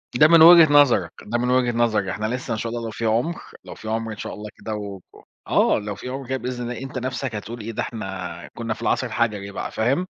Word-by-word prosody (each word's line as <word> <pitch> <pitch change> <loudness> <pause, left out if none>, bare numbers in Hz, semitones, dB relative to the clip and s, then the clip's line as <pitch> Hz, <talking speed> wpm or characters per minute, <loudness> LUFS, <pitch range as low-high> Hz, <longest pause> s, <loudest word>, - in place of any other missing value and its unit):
ده 150 +5 +7
من 165 0 +6
وجهة 165 -2 +9
نظرك، 145 -4 +5
ده 115 +3 -1
من 125 +1 -1
وجهة 125 -1 +3
نظرك، 115 -4 +1
إحنا 105 +3 -3
لسه 125 +2 -3
إن 110 - -2
شاء 115 0 -3
الله 120 -1 -4
لو 110 - -4
في 115 +1 -4
عُمر، 120 +10 0 0.3
لو - - -9
في 110 - -11
عُمر 115 0 -2
إن 110 - -7
شاء - - -6
الله 105 0 -8
كده 110 - -5
و 100 -2 -6
و - - -17 0.2
آه، - - +3
لو 105 -1 -5
في 125 - -8
عُمر 135 0 -6
كده 130 +1 -1
بإذن 125 -1 -5
الله، 125 - -6
أنت 135 -1 -6
نَفسَك 130 -1 -3
هتقول 115 +3 -6
إيه 115 +2 -5
ده - - -3
إحنا 95 -5 -6
كُنّا 115 -1 -2
في - - -13
العصر 130 - 0
الحَجَري 105 -4 -1
بقى 100 - -5
فاهم؟ 135 +11 0
115 Hz, 260 wpm, -23 LUFS, 110-130 Hz, 0.3 s, وجهة